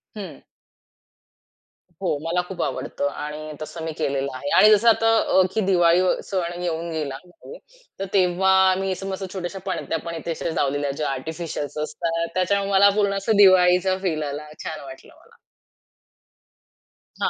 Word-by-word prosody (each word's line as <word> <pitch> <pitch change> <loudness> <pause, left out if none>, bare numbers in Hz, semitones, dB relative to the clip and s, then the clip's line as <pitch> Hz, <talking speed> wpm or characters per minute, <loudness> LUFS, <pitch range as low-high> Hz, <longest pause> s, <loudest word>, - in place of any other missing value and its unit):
हं. 205 -3 -8 1.6
हो, 180 -6 0
मला 170 +2 0
खूप 180 -2 -6
आवडतं 140 - -3
आणि 150 +2 -6
तसं 160 +2 -7
मी 160 - -3
केलेलं 135 0 -1
आहे. 190 - -5
आणि 215 - +8
जसं 220 +3 +5
आता 225 0 +3
अ, 190 - +3
की 220 - +1
दिवाळी 175 -2 +4
व 185 - +3
सण 175 -2 -3
येऊन 170 -1 -3
गेला 150 -4 -3
आहे. 180 - -13 0.4
तर 195 - -2
तेव्हा 185 0 +3 0.3
मी 195 0 -1
असं 190 +1 -5
मस्त 190 0 -4
छोट्याश्या 190 0 -5
पणत्या 165 -4 -2
पण 170 - -5
इथे 165 +1 -5
अशा 165 - -3
लावलेल्या 145 0 0
ज्या 150 - -1
आर्टिफिशियल्स 150 +1 -5
असतात 165 +2 -2
त्याच्यामुळे 200 +2 0
मला 200 +1 +6
पूर्ण 200 -1 +2
असा 195 +3 -1
दिवाळीचा 185 -1 +5
फील 160 -5 -1
आला 145 +1 -5 0.2
छान 155 - -5
वाटलं 135 -1 -12
मला. - - -23 1.8
हां. - - +2
175 Hz, 160 wpm, -23 LUFS, 155-190 Hz, 1.8 s, आणि